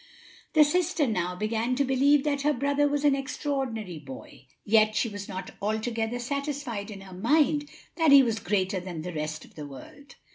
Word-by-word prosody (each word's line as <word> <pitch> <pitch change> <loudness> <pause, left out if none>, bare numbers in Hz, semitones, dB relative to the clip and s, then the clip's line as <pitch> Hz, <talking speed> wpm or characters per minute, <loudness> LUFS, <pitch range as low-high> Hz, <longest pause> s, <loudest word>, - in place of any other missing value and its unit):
The 310 -2 +7
sister 340 +1 +1
now 180 -6 -1
began 225 +5 -1
to 280 +2 +1
believe 270 +2 +3
that 285 -2 0
her 300 +1 +2
brother 285 +2 +1
was 290 0 -1
an 290 - +5
extraordinary 265 - -3
boy; 135 -1 -11 0.2
yet 215 0 +4
she 235 - +1
was 205 -2 -7
not 185 0 -6
altogether 225 +2 -1
satisfied 270 -4 -4
in 200 -2 -8
her 190 -1 -11
mind 290 - +2 0.3
that 325 -3 +4
he 280 -1 +9
was 225 -3 -1
greater 190 -1 0
than 175 -3 -6
the 180 +1 -5
rest 155 0 -4
of - - -20
the 150 -2 -8
world. 145 - -13
230 Hz, 185 wpm, -27 LUFS, 195-285 Hz, 0.3 s, he